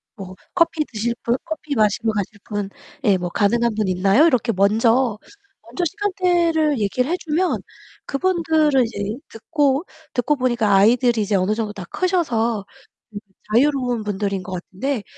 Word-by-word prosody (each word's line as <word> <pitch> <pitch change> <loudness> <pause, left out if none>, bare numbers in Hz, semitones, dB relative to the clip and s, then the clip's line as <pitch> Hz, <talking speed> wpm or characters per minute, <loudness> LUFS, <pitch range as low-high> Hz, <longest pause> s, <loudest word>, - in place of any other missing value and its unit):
뭐 190 -3 -9 0.2
"커피 330 -3 +2
드실 235 +1 -2
분, 235 +1 +1
커피 315 -3 -4
마시러 215 0 +2
가실 205 0 -4
분?" 205 -2 -3 0.3
예, 200 -5 +4
뭐 180 -1 -4
"가능한 230 +5 +1
분 215 -2 0
있나요?" 195 - +4
이렇게 255 -7 +2
먼저 225 +3 +2 0.5
먼저 360 - -4
시간대를 345 - +1
얘기를 250 +8 0
해 360 - +1
주면 335 +3 -1 0.4
그분들을 315 -4 +2
이제 210 -1 -4
듣고 280 +5 0 0.3
듣고 260 +4 +1
보니까 240 -5 +1
아이들이 235 +3 +4
이제 205 0 0
어느 190 +3 +1
정도 215 -2 -3
다 200 -3 -7
크셔서 235 - 0 0.9
자유로운 250 -2 +2
분들인 200 -2 -2
것 185 - -7
같은데 200 +7 -3
235 Hz, 310 characters per minute, -21 LUFS, 205-300 Hz, 0.9 s, 예